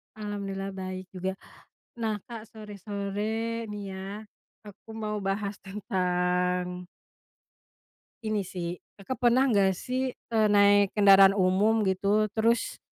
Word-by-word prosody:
Alhamdulillah, 200 -2 -4
baik 185 -1 -6
juga. 190 0 -3 0.6
Nah, 220 -3 -2
Kak, 230 -2 -7
sore-sore 210 +2 -4
nih 205 0 -6
ya, 190 - -7 0.7
aku 205 +2 -14
mau 210 -1 -2
bahas 200 +1 -2
tentang 180 -2 -1 1.4
ini 215 -1 0
sih, 175 -2 -4 0.2
Kakak 240 +4 0
pernah 255 +3 +4
nggak 200 -7 +3
sih, 255 +4 -2 0.2
eee, 220 -1 +4
naik 205 -1 +5
kendaraan 195 -1 +7
umum, 200 +4 +3
gitu, 200 +3 +2
terus, 230 +1 +1
200 Hz, 110 wpm, -28 LUFS, 190-215 Hz, 1.4 s, kendaraan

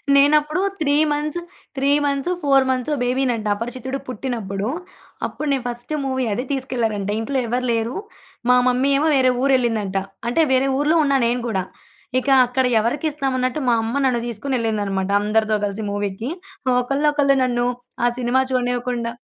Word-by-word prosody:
నేనప్పుడు 300 +4 +4 0.2
3 285 -2 +2 0.2
months 300 +3 -1 0.4
3 275 +1 +1 0.2
months, 280 +4 0
4 275 -2 +4
మంత్సో 260 +3 0
బేబీనంట 245 -3 0
అపరిచితుడు 255 +4 -5
పుట్టినప్పుడు. 215 -5 -3 0.6
అప్పుడు 305 - -5
నేను 270 -3 0
ఫస్ట్ 240 +4 -5
మూవీ 260 -1 -1
అది 245 - -2
తీసుకెళ్లారంట. 230 -7 -1
ఇంట్లో 265 +5 -2
ఎవరు 250 +2 -1
లేరు. 230 +2 -1 0.5
మా 250 - +7
మమ్మీ 255 +2 +2
ఏమో 305 +3 +2
వేరే 255 -1 +4
ఊరెళ్ళిందంట. 230 -7 +1 0.3
అంటే 285 +7 +2
వేరే 260 +1 +3
ఊర్లో 300 +3 +2
ఉన్నా 275 -1 +3
నేను 245 +1 0
కూడా. 190 -5 -1 0.6
ఇక 255 - -8 0.2
అక్కడ 250 +1 0
ఎవరికిస్తాం 275 +4 -1
అన్నట్టు, 255 +4 -1
మా - - +4
అమ్మ 225 +2 -3
నన్ను 240 -2 +1
తీసుకొనెళ్ళిందనమాట 215 -5 -2
అందరితో 215 +1 +1
కలిసి 205 +2 -4
మూవీకి. 205 +3 -3 0.4
ఆహ్, 250 - +3
ఒకళ్ళనొకళ్ళు 280 +1 +2
నన్ను 240 -1 +1 0.4
ఆ - - +5
సినిమా 250 +1 +2
చూడనివ్వకుండా 245 -2 -1
250 Hz, 145 wpm, -21 LUFS, 230-275 Hz, 0.6 s, మా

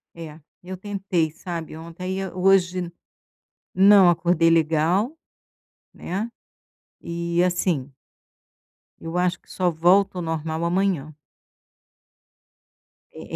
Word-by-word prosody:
É, 160 -1 -9 0.2
eu 185 +1 -8
tentei, 190 -5 -2
sabe, 165 -1 -7
ontem 165 +2 -10
aí, 190 +1 -3
eh, 190 -2 -5
hoje, 180 -1 +2 0.8
não 195 -1 +7
acordei 170 -1 +2
legal, 165 - +2 0.8
né, 200 +6 -4 0.7
e 170 +1 -1
assim 175 -6 -1 1.1
eu 165 +2 -5
acho 180 0 0
que - - -19
só 180 -1 0
volto 180 +4 +3
ao - - -2
normal 160 0 -3
amanhã. 170 -4 0 2.0
É - - -11
175 Hz, 105 wpm, -23 LUFS, 165-185 Hz, 2.0 s, não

